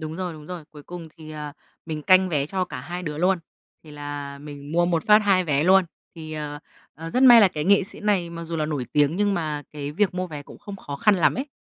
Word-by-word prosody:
đúng 155 +1 -6
rồi, 180 -2 -3
đúng 155 -1 -12
rồi. 175 -4 -7
Cuối 150 -1 -13
cùng 170 -1 -9
thì, 155 -1 -11
ờ, 150 -1 -7 0.3
mình 155 -2 -4
canh 185 +2 +5
vé 145 -4 0
cho 185 +2 -1
cả 125 - -7
hai 175 +6 -6
đứa 150 -2 -5
luôn, 185 +1 +2 0.4
thì 155 - -14
là 145 -1 -7
mình 145 0 -10
mua 175 +1 +3
một 170 -2 0
phát 210 0 +7
2 195 -3 +2
vé 145 -3 +1
luôn. 190 0 +5 0.3
Thì, 155 -1 -8
ờ, 150 -1 -5 0.4
ờ, 165 +1 -8
rất 255 - +1
may 240 -3 +9
là 200 - +6
cái 150 -3 -4
nghệ 200 +1 +5
sĩ 215 - -5
này 195 -5 0
mặc 170 0 -7
dù 165 0 -4
là 155 -1 -1
nổi 145 -5 -3
tiếng, 145 +3 +2
nhưng 205 -1 +1
mà 155 -3 -3
cái 145 -1 -5
việc 190 +1 +1
mua 185 0 -2
vé 150 -4 -8
cũng - - -14
không 200 -1 -9
khó 140 -6 -7
khăn 210 +7 +4
lắm 175 - +3
ấy. 265 +4 -3
165 Hz, 270 wpm, -24 LUFS, 150-185 Hz, 0.4 s, may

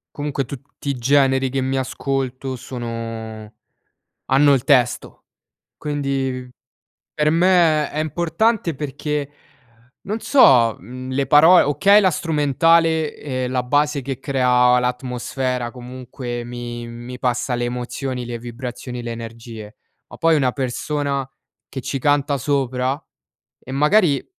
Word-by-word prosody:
comunque 145 -2 -2
tutti 140 +2 -8
i 140 - +1
generi 135 0 +3
che 135 - -2
mi 130 +1 -1
ascolto 130 0 -3
sono 115 -3 -6 0.7
hanno 140 +1 +4
il 125 - -1
testo. 125 -5 +1 0.5
Quindi 135 -3 -3 0.7
per 150 0 +1
me 165 -3 +3
è 150 - -3
importante 170 +4 0
perché, 145 +1 -3 0.8
non 215 +3 -2
so, 125 - +5
mhmm, 130 +7 -8
le 135 0 0
paro 160 +5 +7
okay, 200 +8 +5
la 190 - +4
strumentale 160 0 +2
e 130 -3 -3
la 125 0 0
base 145 +3 +1
che 135 -1 -5
crea 125 -2 +3
l'atmosfera 125 0 -2
comunque 125 0 -7
mi 120 -1 -6
mi 120 +2 -9
passa 125 0 -1
le 120 0 -1
emozioni, 125 +1 -4
le 120 0 -5
vibrazioni, 120 +1 -7
le 120 - -4
energie, 115 -2 -9 0.3
ma - - -12
poi 165 0 +3
una 135 -4 +2
persona 140 +1 -2 0.4
che 130 - -6
ci 135 - -3
canta 145 0 +1
sopra 130 0 -1 0.6
e 130 - -10
magari 150 +2 +3
130 Hz, 125 wpm, -21 LUFS, 125-145 Hz, 0.8 s, paro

